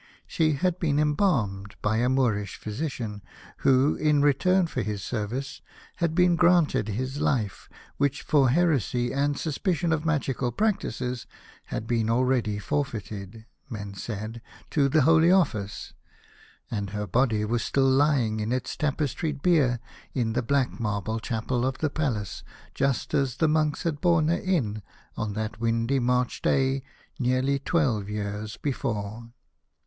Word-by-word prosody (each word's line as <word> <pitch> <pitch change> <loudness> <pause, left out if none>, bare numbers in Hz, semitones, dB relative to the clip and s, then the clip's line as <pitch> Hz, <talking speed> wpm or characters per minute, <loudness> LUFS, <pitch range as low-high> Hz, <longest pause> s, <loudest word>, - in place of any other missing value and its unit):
She 155 -1 +1
had 180 +5 0
been 150 -4 +1
embalmed 135 - +1
by 105 +1 +1
a 120 +2 +2
Moorish 115 -7 +1
physician, 110 -3 -4 0.4
who 135 +2 +4
in 150 -2 +3
return 180 +6 +3
for 130 -6 -3
this 105 -3 -3
service 120 +6 -4 0.4
had 170 -2 0
been 180 -1 +4
granted 170 - +3
his 130 +6 -3
life, 110 -8 -1 0.3
which 140 -1 0
for 140 -4 +3
heresy 130 - +1
and 140 +1 +1
suspicion 165 +2 0
of 155 -1 -1
magical 135 -6 0
practices 125 - -1 0.4
had - - -4
been 115 -1 0
already 120 -3 +1
forfeited, 110 -4 -4 0.2
men 100 -3 -6
said, 110 +3 -6 0.3
to 140 -3 +3
the 155 +1 +4
Holy 165 +3 +5
Office, 110 - 0 0.8
and 100 -3 -2
her 105 +1 -3
body 110 +1 +1
was 115 +2 0
still 135 -1 +1
lying 130 -5 +2
on 105 +2 -2
its 125 0 -2
tapestried 150 0 -2
bier 145 -9 +3 0.4
in 115 -4 0
the - - +1
black 130 +1 0
marble 110 0 -2
chapel 120 +2 -2
of 130 0 -1
the 155 -2 -1
Palace, 125 -11 -2 0.3
just 135 -1 -1
as 135 -3 +1
the 160 - +3
monks 155 -1 +1
had 160 -4 -2
borne 170 -3 +3
her 170 - +3
in 125 - -1 0.3
on 105 -1 -3
that 110 +1 -4
windy 115 +3 +1
March 125 0 0
day 135 0 +2 0.4
nearly 130 +2 +1
twelve 130 - 0
years 105 0 -4
before. 115 -5 -3
130 Hz, 145 wpm, -26 LUFS, 110-150 Hz, 0.8 s, Holy